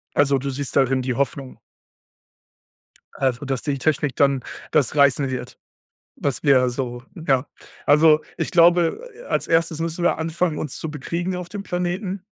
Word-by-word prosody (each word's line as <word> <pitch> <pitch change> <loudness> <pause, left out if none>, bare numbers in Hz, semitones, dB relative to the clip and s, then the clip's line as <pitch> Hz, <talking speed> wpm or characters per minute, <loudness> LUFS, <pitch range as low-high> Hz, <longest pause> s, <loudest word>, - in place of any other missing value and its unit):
Also, 140 -1 +3
du 140 +2 -4
siehst 140 0 -4
darin 135 -1 +3
die 125 0 -2
Hoffnung? 135 0 -3 1.6
Also, 130 0 -1
dass 135 -2 -2
die 140 -2 -2
Technik 145 -1 0
dann 140 -2 +2 0.3
das 145 -2 +2
reißen 140 -1 +4
wird, 130 -1 -5 0.6
was 125 -5 -2
wir 130 -3 +4
so 120 -1 -4 0.3
ja. 135 0 +3 0.4
Also, 155 +1 +5 0.2
ich - - -2
glaube, 175 - +3
äh, 475 - -13
als - - -1
Erstes 165 -1 +1
müssen 165 +1 -3
wir 175 - +2
anfangen, 160 0 -1
uns 150 - -5
zu 160 - -5
bekriegen 170 +5 -3
auf 180 -1 -6
dem 205 +1 -6
Planeten. 180 +1 -3
145 Hz, 160 wpm, -22 LUFS, 135-170 Hz, 1.6 s, Also